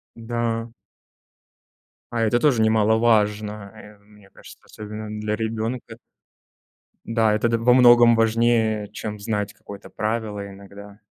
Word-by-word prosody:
Да. 115 0 -3 1.4
А 115 -1 -1
это 115 +2 +1
тоже 125 -6 +2
немаловажно, 105 -2 +1
э, 105 -1 -15
мне 100 -1 -22
кажется, - - -16
особенно 105 0 -9
для 105 0 -2
ребенка. 115 +1 -4 1.1
Да, 115 -2 +1
это 110 +2 +1
д 115 - +1
во 120 +2 +3
многом 120 -2 +6
важнее, 115 -2 +1
чем 105 -1 -6
знать 105 -1 -3
какое-то 100 -1 -12
правило 105 -2 -3
иногда. 100 +1 -13
110 Hz, 120 wpm, -22 LUFS, 105-115 Hz, 1.4 s, многом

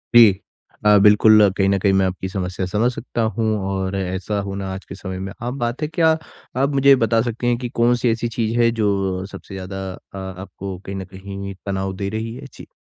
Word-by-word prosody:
जी। 115 -3 +10 0.6
अ, 105 0 +7
बिल्कुल 105 0 +6
कहीं 100 -1 +3
न 100 - +3
कहीं 100 0 +3
मैं 95 0 +3
आपकी 95 0 -3
समस्या 95 -1 -3
समझ 110 +6 +1
सकता 120 -1 -4 0.2
हूँ 110 -1 +1
और 95 0 -2
ऐसा 95 +2 -2
होना 100 -1 -4
आज 95 - -8
के 95 - -9
समय 95 -1 -6
में 95 +1 -5
आम 125 +3 -3
बात 120 +4 -2
है। 150 - 0
क्या 160 0 +2 0.5
आप 140 - +3
मुझे 140 0 +4
ये 135 - +9
बता 115 -2 +2
सकती 120 0 -2
हैं 120 -1 +2
कि 125 -1 -4
कौन-सी 120 0 +2
ऐसी 115 +1 -1
चीज़ 115 0 -1
है 115 - +5
जो 95 -2 0
सबसे - - -10
ज़्यादा 95 0 -6
अ, 100 - -13
आपको 95 0 -7
कहीं 100 - -5
न 95 - -5
कहीं 100 +1 -7
तनाव 95 -1 -2
दे 100 0 -3
रही 110 +1 -4
है? 135 +2 -9
जी। - - -12
100 Hz, 220 wpm, -21 LUFS, 95-115 Hz, 0.6 s, जी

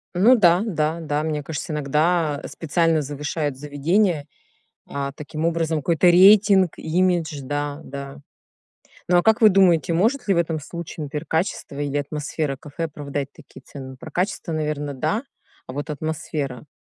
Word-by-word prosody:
Ну 220 +8 +6
да, 180 -5 +5
да, 160 -5 -1
да, 150 -2 -2
мне 155 -1 -2
кажется, 150 +2 -5
иногда 150 +1 +1
специально 165 0 +1
завышают 145 0 -3
заведения, 150 +3 0 0.6
а, 140 -1 -3
таким 150 +2 -6
образом 165 -1 0
какой-то 165 +4 +2
рейтинг, 190 +1 +6
имидж, 170 -2 0
да, 145 +2 -3
да. 140 +1 -8 0.9
Ну, 180 - +4
а 175 - +3
как 220 +1 +3
вы 215 - +8
думаете, 180 -4 +4
может 225 +11 +1
ли 195 - +4
в - - 0
этом 165 -2 0
случае, 160 0 -7
например, 150 +2 -5
качество 160 -3 -2
или 145 0 -1
атмосфера 145 0 -3
кафе 145 +4 -7
оправдать 145 -2 -5
такие - - -15
цены? 130 -2 -9
Про 160 +3 -10
качество, 180 +1 -2
наверное, 150 -2 -2
да, 210 - -1 0.4
а 130 - -8
вот 145 +3 -5
атмосфера? 150 -3 -4
155 Hz, 155 wpm, -23 LUFS, 145-175 Hz, 0.9 s, вы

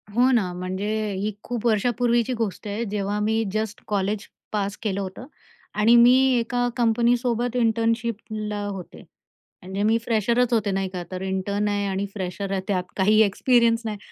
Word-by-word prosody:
हो 250 +2 +5
ना. 210 -8 +2
म्हणजे 185 +3 -4 0.3
ही 200 +3 -2
खूप 240 -1 -4
वर्षापूर्वीची 235 +2 +1
गोष्ट 225 -3 -3
आहे, 205 +3 -2
जेव्हा 205 0 -1
मी 220 +2 +1
जस्ट 215 -1 -3
कॉलेज 200 0 -1 0.2
पास 205 -1 -2
केलं 200 -3 -1
होतं 190 +5 -7 0.5
आणि 225 +3 +6
मी 240 +1 +7 0.3
एका 245 +1 0
कंपनीसोबत 240 +1 +1
इंटर्नशिपला 225 -2 -1
होते. 195 -3 -7 0.6
म्हणजे 190 +2 -3
मी 220 +2 +3
फ्रेशरच 235 +2 +1
होते, 215 -3 +1
नाही 195 0 -1
का, 180 -2 -5
तर 185 0 -5
इंटर्न 190 +2 -1
आहे 205 -1 0
आणि 195 +1 -1
फ्रेशर 190 0 -4
आहे 195 -1 0
त्यात 185 -3 0
काही 210 +3 +4
एक्सपिरियन्स 230 +2 +3
नाही, 215 -1 -3
215 Hz, 155 wpm, -24 LUFS, 195-235 Hz, 0.6 s, मी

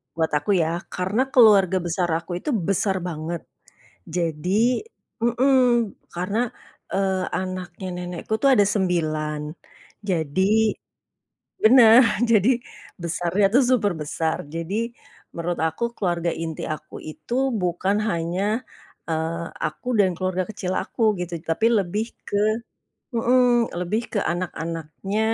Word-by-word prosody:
buat 160 -1 +1
aku 205 - -2
ya 170 +2 -2
karena 190 +7 0
keluarga 200 -6 +6
besar 175 +1 0
aku 170 +2 -11
itu - - -2 0.2
besar 195 0 +1
banget, 165 +1 -4 0.8
jadi 180 - +1 0.4
mhm, 240 +4 +2 0.6
karena, 185 +5 -2 0.6
eee, 190 -1 +1 0.2
anaknya 185 0 -6
nenekku 180 +3 -6
itu 275 - +3
ada 205 -4 +5
9 155 -6 0 0.7
jadi 160 0 0 1.2
benar 235 0 +8 0.3
jadi 215 +1 +5 0.5
besarnya 170 +3 +1
tuh 265 - +6
super 210 -7 +2
besar 160 +2 -1 0.2
jadi, 165 +4 -3 0.6
menurut 170 +1 -2
aku 160 +8 -4
keluarga 175 -2 0
inti 160 -1 -5
aku 155 0 -14
itu 155 +9 -8 0.3
bukan 180 +3 0
hanya, 170 +1 -1 0.7
eee, 165 +1 -1 0.2
aku 155 +10 -6
dan 190 -2 +4
keluarga 185 0 -1
kecil 190 -3 -3
aku - - -8 0.2
gitu 175 0 -4 0.2
tapi 220 +8 +2
lebih 200 +4 -1 0.2
ke 205 - -1 0.8
mhm, 240 0 +3
lebih 210 +6 -1
ke 215 - 0
anak-anaknya 170 +2 -4
180 Hz, 115 wpm, -23 LUFS, 165-210 Hz, 1.2 s, benar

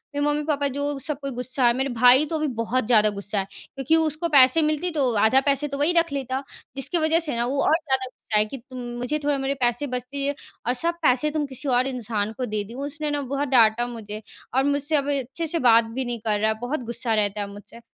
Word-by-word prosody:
मेरे 290 0 0
मम्मी-पापा 295 -1 0
जो 285 +1 -2
सब 290 0 -5
कोई 275 0 -4
गुस्सा 250 +1 -2
है। 235 - +4
मेरे 265 +1 0
भाई 250 +4 +6
तो 320 - -4
अभी 305 0 -1
बहुत 245 +2 0
ज़्यादा 215 -3 +5
गुस्सा 205 0 -3
है, 190 - -2 0.3
क्योंकि 270 +4 +2
उसको 320 +1 +1
पैसे 280 +1 +6
मिलती 310 +3 0
तो 280 -6 +1
आधा 220 +6 +4
पैसे 280 +1 +1
तो 280 -1 -5
वही 295 +5 +2
रख 335 -2 +2
लेता। 265 -1 -3 0.3
जिसकी 280 +5 -1
वज़ह 320 0 +3
से 315 -6 -3
ना, 235 +1 0
वो 275 +3 -1
और - - +3
ज़्यादा 265 -5 -1
गुस्सा 240 -3 -4
है, 210 - +3
कि 245 +6 -7
तुम 255 +1 -12 0.2
मुझे 250 +5 -2
थोड़ा 290 -1 +1
मेरे 270 0 -1
पैसे 245 +4 +1
बचती 255 +2 -4
है 285 +1 -1 0.3
और 245 - +3
सब 335 +7 0
पैसे 295 0 +2
तुम 300 -1 -1
किसी 275 +1 -8
और 250 +1 +3
इंसान 220 -5 -2
को 255 - -2
दे 215 -2 -2
दी। 210 +3 -11
उसने 290 +4 -4
ना 290 0 -1
बहुत 280 +2 -2
डाँटा 240 -2 +4
मुझे 215 -3 -7 0.3
और 265 - +4
मुझसे 285 +2 0
अब 285 -1 +1
अच्छे 270 +6 -5
से 335 +2 -1
बात 230 -3 +6
भी 245 +4 -4
नहीं 240 -1 -4
कर 210 -2 +1
रहा 215 +1 +2
है। 220 - -5
बहुत 260 +6 -2
गुस्सा 235 0 -2
रहता 205 -1 0
है 200 - -3
मुझसे। 205 +3 -12
265 Hz, 250 wpm, -24 LUFS, 240-290 Hz, 0.3 s, भाई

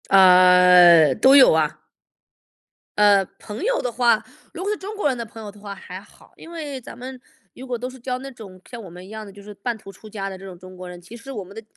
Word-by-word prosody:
呃， 180 -4 +6
都 265 +1 +5
有 270 - +7
啊。 155 -2 -1 1.2
呃， 205 -1 +4 0.2
朋 210 - -8
友 - - 0
的 245 - -3
话 235 -1 +1 0.3
如 - - -7
果 400 - -3
是 425 - -3
中 405 +3 -8
国 405 - 0
人 260 -3 -1
的 235 - -5
朋 225 +1 -13
友 210 - -8
的 205 - -19
话 200 -1 -8
还 190 -1 -10
好。 205 - -22
因 330 - -14
为 295 -5 -7
咱 235 - -12
们 255 +1 -9 0.4
如 260 - -10
果 250 -2 -4
都 250 +2 -6
是 260 - -13
交 250 +1 -4
那 270 +1 -9
种 195 -7 -14
像 240 -2 -9
我 195 - -11
们 180 +2 -12
一 - - -15
样 220 0 -8
的， 200 - -12
就 200 +1 -15
是 210 +1 -11
半 225 +3 -5
途 195 -2 -13
出 215 +3 -15
家 195 -2 -5
的 190 - -9
这 195 - -13
种 185 -2 -10
中 185 0 -13
国 180 0 -9
人， 175 0 -11
其 180 +7 -13
实 270 +4 -11
我 215 -7 -6
们 190 +2 -15
的 225 - -9
210 Hz, 285 characters per minute, -21 LUFS, 185-250 Hz, 1.2 s, 有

